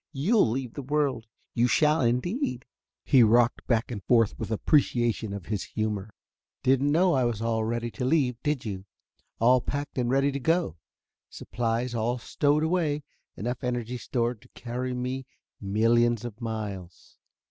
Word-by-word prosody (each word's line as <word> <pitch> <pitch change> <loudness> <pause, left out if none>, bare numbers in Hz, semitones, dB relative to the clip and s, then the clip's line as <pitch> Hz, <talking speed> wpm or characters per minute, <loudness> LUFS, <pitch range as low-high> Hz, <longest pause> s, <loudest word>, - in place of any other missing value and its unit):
You'll 170 - +3
leave 125 0 -3
the - - -5
world, 135 -4 -1 0.3
you 120 0 +3
shall, 150 +6 +3
indeed." 125 - -1 0.4
He 130 - +5
rocked 120 +1 +3
back 115 0 +1
and 100 -5 -5
forth 115 -2 +3
with - - -4
appreciation 120 -2 +1
of 100 -3 -6
his 105 -3 -2
humor. 110 -2 -3 0.5
"Didn't 135 +2 +3
know 175 +4 +4
I 130 -2 +2
was 120 -3 -1
all 115 -1 0
ready 120 +1 -2
to 130 - -5
leave, 130 -4 +1
did 150 -4 -1
you? 95 -3 -5 0.5
All 125 +2 +4
packed 145 +1 -4
and 120 -1 0
ready 135 +2 +2
to 140 - -3
go. 160 - 0 0.5
Supplies 120 +1 -2
all 120 +2 0
stowed 145 +5 +1
away; 160 -3 0 0.3
enough 120 +4 -4
energy 125 0 -2
stored 120 -3 -2
to - - -20
carry 125 +1 -4
me 125 +1 -4 0.3
millions 115 +3 +2
of 120 0 -8
miles. 105 -6 -6
120 Hz, 160 wpm, -27 LUFS, 115-135 Hz, 0.5 s, He